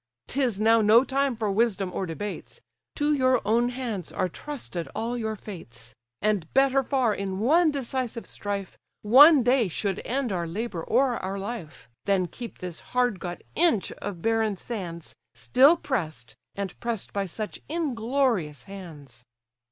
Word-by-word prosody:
'Tis 245 - 0
now 225 +1 +5
no 220 +3 +6
time 275 -1 0
for 215 -2 -1
wisdom 200 -3 +1
or 190 - -2
debates; 200 +5 -6 0.4
To 295 0 +2
your 255 -3 +3
own 235 +3 +3
hands 240 -8 -4
are 185 - 0
trusted 185 - -6
all 235 +2 -2
your 220 -2 -2
fates; 120 - -10 0.3
And 205 -6 0
better 270 0 +4
far 260 -4 +1
in 195 -1 -3
one 310 - +4
decisive 260 -4 -3
strife, 200 -1 -5 0.2
One 275 +6 +8
day 245 -2 +3
should 190 +2 -2
end 255 -2 -1
our 175 -3 -2
labour 185 -1 -4
or 250 0 +2
our 190 +1 -3
life, 190 - -7 0.2
Than 195 -2 +2
keep 235 +6 -8
this 180 -2 -6 0.2
hard 245 -6 +2
got 175 -2 -6
inch 320 - +2
of 180 -5 -7
barren 225 -2 +1
sands, 175 -7 -6 0.2
Still 280 +7 +5
press'd, 155 - -3 0.2
and 200 -2 -4
press'd 235 -4 -4
by 200 -1 -1
such 210 +4 -6
inglorious 245 - 0
hands." 155 -11 -11
220 Hz, 150 wpm, -26 LUFS, 185-255 Hz, 0.4 s, One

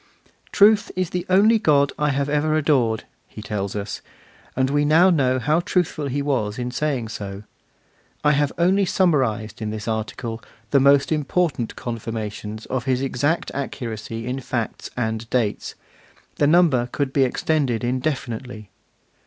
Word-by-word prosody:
'Truth 205 +1 +5
is 185 -2 -1
the 180 -1 -3
only 210 +5 +5
God 140 -7 +3
I 150 0 +2
have 140 0 0
ever 150 +1 +1
adored,' 130 -8 +1 0.2
he - - -12
tells 100 -1 -3
us: 100 0 -4 0.5
and 130 0 +2
we 145 0 +2
now 165 +5 +5
know 130 -6 +2
how 150 +5 +1
truthful 175 -4 -1
he 140 +2 -2
was 115 -7 -1
in 125 0 -3
saying 135 -5 -2
so. 100 -1 -6 0.8
I 150 - +5
have 145 -1 +1
only 185 +4 +3
summarised 130 - +1
in 110 - -2
this 105 0 -6
article 115 +1 -4 0.3
the 140 - +5
most 140 +2 +4
important 150 -4 0
confirmations 110 -2 -5
of 125 -2 -3
his 130 0 0
exact 145 +5 0
accuracy 115 -4 -5
in 125 +2 -3
facts 120 -3 -4
and 110 -1 -2
dates; 115 -5 -1 0.6
the 145 - +3
number 150 -7 +4
could 140 -2 -2
be 140 - +4
extended 130 -2 0
indefinitely. 125 -4 -3
130 Hz, 150 wpm, -22 LUFS, 115-150 Hz, 0.8 s, Truth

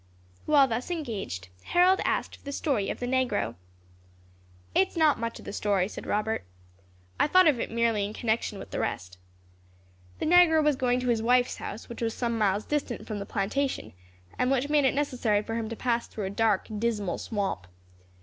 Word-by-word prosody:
While 285 -3 +6
thus 240 +4 -3
engaged, 215 - -4 0.2
Harold 365 +2 +4
asked - - -1
for - - -27
the 280 - -5
story 275 -8 -1
of - - -4
the 245 - -2
negro. 245 - 0 1.2
"It 190 - +4
is - - -13
not 310 -5 +4
much 230 0 -4
of - - -13
a - - -5
story," 200 -3 +1
said - - -8
Robert; 215 - -1 0.8
"I - - +4
thought 370 +4 +6
of 280 -6 +3
it - - -2
merely 230 -2 +1
in 200 - -3
connection 220 -1 -1
with - - -10
the - - -3
rest. 90 0 -4 1.0
The - - -3
negro 325 -2 +6
was 300 -1 +3
going 250 -1 +1
to 250 - -1
his 230 -2 +2
wife's 245 +2 +2
house, 215 - -7
which 235 - -8
was 225 -1 -1
some 235 -1 -1
miles 205 -1 +1
distant 290 -5 -2
from 215 -2 -4
the 200 - -6
plantation, 210 - -2 0.5
and 250 - +2
which 270 +1 +1
made 295 -2 +3
it 265 - +2
necessary 245 -7 +1
for 225 - -5
him 225 -1 -2
to 230 - -4
pass 235 0 -1
through 210 - -5
a 190 - -3
dark, 215 -2 +1
dismal 215 -4 -1
swamp. 195 - -3
235 Hz, 200 wpm, -28 LUFS, 210-270 Hz, 1.2 s, While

